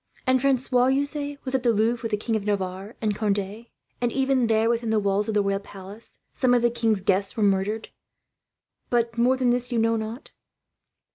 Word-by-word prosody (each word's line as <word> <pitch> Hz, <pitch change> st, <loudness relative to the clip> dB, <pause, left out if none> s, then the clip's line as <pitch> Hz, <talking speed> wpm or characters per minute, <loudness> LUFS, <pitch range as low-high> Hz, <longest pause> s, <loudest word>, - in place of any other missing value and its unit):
"And 255 Hz, 0 st, +3 dB
Francois, 255 Hz, -2 st, +2 dB
you 270 Hz, +2 st, +2 dB
say, 285 Hz, -1 st, -5 dB
was 260 Hz, -, -1 dB
at 265 Hz, -, +2 dB
the 240 Hz, -1 st, +3 dB
Louvre 225 Hz, +2 st, +1 dB
with 225 Hz, -, -3 dB
the 210 Hz, -, 0 dB
King 225 Hz, +2 st, -2 dB
of 215 Hz, -, -1 dB
Navarre 195 Hz, +1 st, -3 dB
and 215 Hz, -1 st, +1 dB
Conde; 205 Hz, +2 st, -2 dB, 0.3 s
and 240 Hz, -1 st, +1 dB
even 265 Hz, -2 st, +1 dB
there, 220 Hz, 0 st, +2 dB
within 235 Hz, -1 st, 0 dB
the 220 Hz, -, +2 dB
walls 200 Hz, 0 st, +1 dB
of 220 Hz, -, -2 dB
the 205 Hz, -, +3 dB
royal 195 Hz, 0 st, 0 dB
palace, 200 Hz, +2 st, -8 dB, 0.2 s
some 250 Hz, -2 st, +3 dB
of 240 Hz, -, +2 dB
the 240 Hz, -, +3 dB
king's 225 Hz, -4 st, 0 dB
guests 195 Hz, +2 st, 0 dB
were 215 Hz, -, +1 dB
murdered; 200 Hz, +2 st, 0 dB, 1.0 s
but 235 Hz, -1 st, +1 dB
more 255 Hz, +2 st, +3 dB
than 250 Hz, -2 st, +2 dB
this 245 Hz, +1 st, 0 dB
you 240 Hz, -, 0 dB
know 230 Hz, 0 st, +2 dB
not?" 220 Hz, +5 st, -6 dB
225 Hz, 210 wpm, -25 LUFS, 205-245 Hz, 1.0 s, And